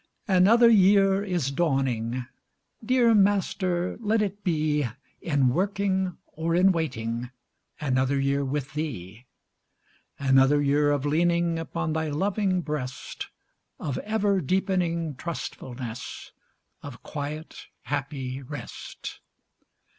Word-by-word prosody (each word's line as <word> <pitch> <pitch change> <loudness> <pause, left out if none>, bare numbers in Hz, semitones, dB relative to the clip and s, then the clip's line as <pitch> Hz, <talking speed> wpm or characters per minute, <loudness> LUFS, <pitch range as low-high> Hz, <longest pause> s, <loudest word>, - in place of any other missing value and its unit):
Another 205 +5 +6
year 195 -2 +5
is 175 -9 -1
dawning! 130 -6 0 0.6
Dear 240 0 +4
Master, 190 -3 +1
let 220 0 +1
it 205 0 -4
be 155 -5 +1 0.3
In 140 -6 +2
working 190 +2 0
or 165 +1 -2
in 185 +2 +5
waiting, 120 -8 -2 0.5
Another 135 -1 +1
year 140 +1 +1
with 140 +2 -3
Thee. 120 - -5 0.9
Another 135 +1 +4
year 145 +1 +3
of 145 -1 0
leaning 170 +2 +2
Upon 160 -1 -3
Thy 160 0 -1
loving 190 +4 0
breast, 135 -6 -5 0.5
Of 140 -4 -3
ever 205 -3 +1
deepening 170 -1 0
trustfulness, 125 -6 -6 0.5
Of 130 -4 -10
quiet, 150 +2 -6 0.2
happy 135 -2 -3
rest. 145 +2 -8
155 Hz, 100 wpm, -26 LUFS, 135-190 Hz, 0.9 s, Another